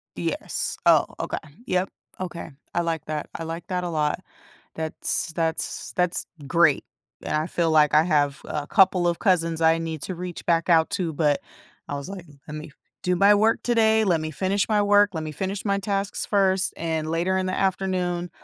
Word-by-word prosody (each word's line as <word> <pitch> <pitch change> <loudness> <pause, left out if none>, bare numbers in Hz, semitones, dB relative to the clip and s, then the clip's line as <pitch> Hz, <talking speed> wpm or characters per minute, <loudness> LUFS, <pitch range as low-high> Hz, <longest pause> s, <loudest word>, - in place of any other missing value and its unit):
Yes. - - -2
Oh, - - +6
okay, - - -2 0.3
yep, 185 +1 0 0.3
okay, 175 -2 -5 0.2
I 175 - +1
like 165 -2 -2
that 155 -1 -4
I 165 - -4
like 165 +1 -6
that 180 -1 -2
a 175 - -2
lot, 150 -2 0 0.6
that's 160 +1 -2
that's 165 -1 -2
that's 180 -1 +1 0.2
great, 150 -1 +3 0.4
and - - -3
I 155 +1 +1
feel 170 -2 0
like 150 -1 +4
I 155 - +7
have 145 -4 +1
a 145 -1 -4
couple 190 -3 +4
of 170 - 0
cousins 165 -5 +1
I 165 0 +4
need 160 -2 -4
to 185 - -4
reach 180 0 -7
back 170 0 +2
out 165 0 +4
to, 180 -5 -2
but 150 -1 +1 0.5
I 145 - -3
was 140 +5 -6
like, 190 -3 -8 0.2
"Let 150 - -7
me 155 0 -7 0.3
do 180 0 +1
my 200 +3 +6
work 220 +2 +2
today, 220 -2 +3
let 170 -5 +2
me 155 0 -4
finish 195 +5 0
my 210 -1 +3
work, 205 0 +5
let 160 -1 -3
me 155 - -5
finish 195 +5 -4
my 200 -1 +1
tasks 200 0 -2
first, 190 -2 +2
and 160 -1 -2
later 175 +3 0
in 185 - -1
the 185 - -1
afternoon, 180 -2 -1
175 Hz, 195 wpm, -24 LUFS, 160-190 Hz, 0.6 s, I